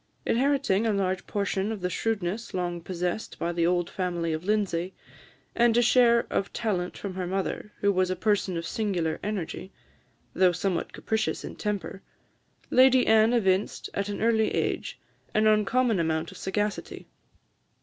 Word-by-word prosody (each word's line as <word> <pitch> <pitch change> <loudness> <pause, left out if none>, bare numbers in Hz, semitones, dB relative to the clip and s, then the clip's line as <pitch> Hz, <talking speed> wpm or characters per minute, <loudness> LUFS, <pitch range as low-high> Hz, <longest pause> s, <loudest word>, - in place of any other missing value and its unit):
Inheriting 255 -5 +2
a 220 - +2
large 190 -2 -1
portion 200 0 -1
of 215 -4 -5
the 180 - -1
shrewdness 215 +1 -2
long 175 -1 -2
possessed 180 +4 -3
by 170 - -1
the 170 -1 +1
old 175 -1 +1
family 175 -3 -2
of 155 +1 -4
Lindsay, 190 -3 -1 0.6
and 235 -1 +3
a 240 - +5
share 235 -1 +5
of 195 - -1
talent 190 -6 -2
from 200 -2 -5
her 185 -1 -3
mother, 195 +2 -3
who 200 - +4
was 185 -1 +1
a 185 - 0
person 195 -2 0
of 165 - -4
singular 175 -8 -1
energy, 195 -2 -4 0.6
though 185 -2 +4
somewhat 180 0 -2
capricious 220 -1 -2
in - - -7
temper, 195 -3 -4 0.7
Lady 255 0 +6
Anne 220 +1 +5
evinced, 195 -4 0
at 200 +1 -2
an 205 - -3
early 225 -1 +3
age, - - -2 0.4
an 215 0 +3
uncommon 215 +1 +3
amount 160 0 -1
of - - -12
sagacity. 205 +2 -3
195 Hz, 160 wpm, -27 LUFS, 180-220 Hz, 0.7 s, Lady